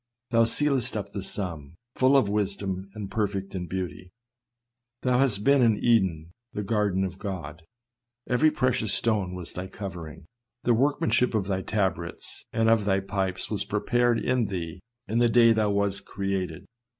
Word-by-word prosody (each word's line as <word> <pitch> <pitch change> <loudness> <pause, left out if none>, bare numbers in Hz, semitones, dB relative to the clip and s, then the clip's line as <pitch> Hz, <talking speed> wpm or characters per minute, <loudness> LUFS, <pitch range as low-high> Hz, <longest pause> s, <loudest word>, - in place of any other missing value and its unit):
" 125 +2 -54
Thou 115 -1 +5
sealest 130 0 +1
up 100 -1 -5
the 100 - -4
sum, 85 -7 -4 0.2
full 130 +2 +4
of 130 - +3
wisdom, 100 -2 -2
and 105 -2 -6
perfect 100 -3 -2
in 90 -2 -4
beauty. 90 +1 -5 0.9
Thou 125 -1 +2
hast 115 -7 +3
been 140 +1 +5
in 115 -3 +4
Eden, 95 -10 +1 0.2
the 105 - -3
garden 100 -3 +1
of 95 0 -4
God; 80 -5 -6 0.7
every 135 +6 +4
precious 125 -8 +1
stone 95 -3 +1
was 90 -2 -7
thy 90 +1 -5
covering 85 -5 -8 0.2
— 120 +1 -43
the 120 - +3
workmanship 125 -2 +2
of 105 -3 +1
thy 95 -1 -1
tabrets 95 -5 -2
and 115 0 +1
of 110 -2 +4
thy 95 -1 +2
pipes 95 -1 -2
was 105 - 0
prepared 120 +3 +1
in 125 -1 +1
thee 90 -2 -5 0.3
in 115 +2 0
the 120 0 +4
day 115 0 +6
that 115 - +3
thou 105 -1 +2
wast 100 -1 0
created. 95 -4 -3
100 Hz, 175 wpm, -26 LUFS, 95-115 Hz, 0.9 s, day